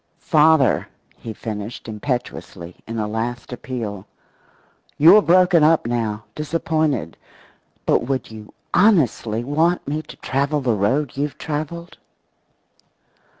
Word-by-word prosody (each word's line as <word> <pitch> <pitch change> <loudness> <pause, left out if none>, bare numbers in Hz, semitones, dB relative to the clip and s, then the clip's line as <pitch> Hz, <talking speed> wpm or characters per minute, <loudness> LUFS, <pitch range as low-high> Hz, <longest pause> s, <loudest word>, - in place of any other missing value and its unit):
Father," 155 -4 +3 0.3
he 115 - -8
finished, 110 +1 -6
impetuously, 105 -6 -5
in 115 0 -5
a 105 -1 -1
last 120 +3 -4
appeal, 115 -7 -6 0.9
"you're 170 +8 +8
broken 180 -2 +4
up 160 -3 +4
now, 115 -3 -2
disappointed, 155 - -1 0.7
but 115 - +2
would 130 -4 -2
you 110 -1 -11 0.2
honestly 140 - +2
want 160 +6 0
me 150 +2 -2
to - - -13
travel 140 +3 -1
the 130 -4 0
road 125 +7 0
you've 145 +1 -2
traveled?" 160 +3 -5
135 Hz, 110 wpm, -21 LUFS, 110-155 Hz, 0.9 s, you're